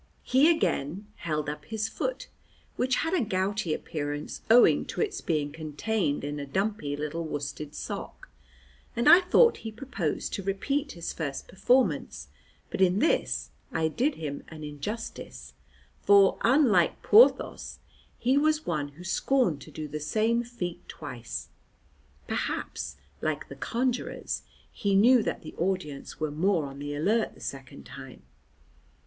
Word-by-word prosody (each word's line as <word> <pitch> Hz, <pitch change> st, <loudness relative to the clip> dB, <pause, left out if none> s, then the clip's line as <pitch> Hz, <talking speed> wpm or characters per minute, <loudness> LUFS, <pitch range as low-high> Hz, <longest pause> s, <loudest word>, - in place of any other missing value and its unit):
He 270 Hz, +5 st, +5 dB
again 185 Hz, -, 0 dB
held 150 Hz, -3 st, -2 dB
up 150 Hz, +1 st, -5 dB
his 220 Hz, -1 st, -2 dB
foot, -, -, -3 dB, 0.5 s
which 255 Hz, +1 st, +1 dB
had 325 Hz, -, -1 dB
a 360 Hz, -, +3 dB
gouty 195 Hz, -3 st, -1 dB
appearance 145 Hz, -1 st, -4 dB
owing 240 Hz, +2 st, +6 dB
to -, -, -6 dB
its 405 Hz, -3 st, -1 dB
being 150 Hz, -3 st, -1 dB
contained 155 Hz, +2 st, -2 dB
in 145 Hz, +1 st, -3 dB
a 140 Hz, -, -4 dB
dumpy 190 Hz, -4 st, -1 dB
little 150 Hz, +3 st, -3 dB
worsted 145 Hz, -1 st, -5 dB
sock, -, -, -6 dB, 0.7 s
and 235 Hz, -, +1 dB
I 355 Hz, -, +10 dB
thought 460 Hz, +6 st, +5 dB
he 220 Hz, -, -6 dB
proposed 215 Hz, -, -3 dB
to -, -, -2 dB
repeat 275 Hz, +10 st, -1 dB
his 170 Hz, -1 st, -5 dB
first 140 Hz, -4 st, -4 dB
performance, 250 Hz, +7 st, +1 dB, 0.4 s
but -, -, -2 dB
in 185 Hz, 0 st, +4 dB
this 315 Hz, -, +1 dB, 0.2 s
I 160 Hz, 0 st, +1 dB
did 265 Hz, -, 0 dB
him 145 Hz, -3 st, -5 dB
an 155 Hz, -1 st, -10 dB
injustice, 145 Hz, -, -6 dB, 0.5 s
for, 200 Hz, -1 st, +5 dB
unlike 230 Hz, -, +4 dB
Porthos, 455 Hz, +4 st, +4 dB, 0.4 s
he 260 Hz, +4 st, +3 dB
was 310 Hz, +1 st, +2 dB
one 150 Hz, -4 st, -1 dB
who 170 Hz, +5 st, -12 dB
scorned 190 Hz, -, +1 dB
to -, -, -11 dB
do 155 Hz, +1 st, -5 dB
the 150 Hz, +1 st, -5 dB
same 225 Hz, +9 st, +1 dB
feat 185 Hz, -8 st, -5 dB
twice; 120 Hz, -6 st, -7 dB, 0.8 s
perhaps, 70 Hz, +1 st, -3 dB, 0.3 s
like 155 Hz, -2 st, -2 dB
the 140 Hz, -, -8 dB
conjurors, 245 Hz, -, -2 dB, 0.3 s
he 200 Hz, -1 st, 0 dB
knew 240 Hz, +5 st, +6 dB
that -, -, -3 dB
the 155 Hz, -, -8 dB
audience 170 Hz, -6 st, -2 dB
were 155 Hz, -1 st, -1 dB
more 165 Hz, +1 st, +1 dB
on 140 Hz, 0 st, -8 dB
the 145 Hz, 0 st, -4 dB
alert 215 Hz, +9 st, +1 dB
the -, -, -16 dB
second 130 Hz, -, -7 dB
time. -, -, -11 dB
180 Hz, 145 wpm, -28 LUFS, 150-235 Hz, 0.8 s, I